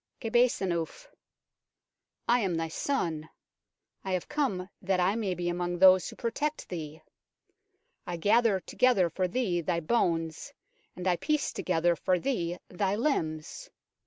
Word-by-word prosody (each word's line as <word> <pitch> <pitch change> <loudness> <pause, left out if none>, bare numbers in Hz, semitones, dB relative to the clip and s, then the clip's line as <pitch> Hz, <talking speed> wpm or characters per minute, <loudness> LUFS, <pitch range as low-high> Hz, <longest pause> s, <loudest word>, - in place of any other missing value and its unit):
QEBHSENNUF: 225 - 0 0.6
" - - -57
I 240 +1 +4
am 190 -6 0
thy 165 0 -2
son. 160 - -2 0.7
I 190 - -2
have 180 - -2
come 255 -12 -1
that 190 -1 0
I 180 +2 +3
may 205 -5 -1
be 175 0 -3
among 175 0 -1
those 185 -1 +6
who - - -10
protect 290 +6 -3
thee. 155 -2 -6 1.0
I 175 - -3
gather 210 +2 +3
together 210 -9 +2
for 185 +3 0
thee 185 -5 0
thy 170 0 0
bones 165 -4 -1 0.4
and 180 +1 -4
I 180 -1 +3
piece 300 - 0
together 175 -1 +1
for 185 +2 +1
thee 175 -6 -2
thy 190 +2 -1
limbs. 210 - -2
185 Hz, 140 wpm, -29 LUFS, 170-230 Hz, 1.0 s, those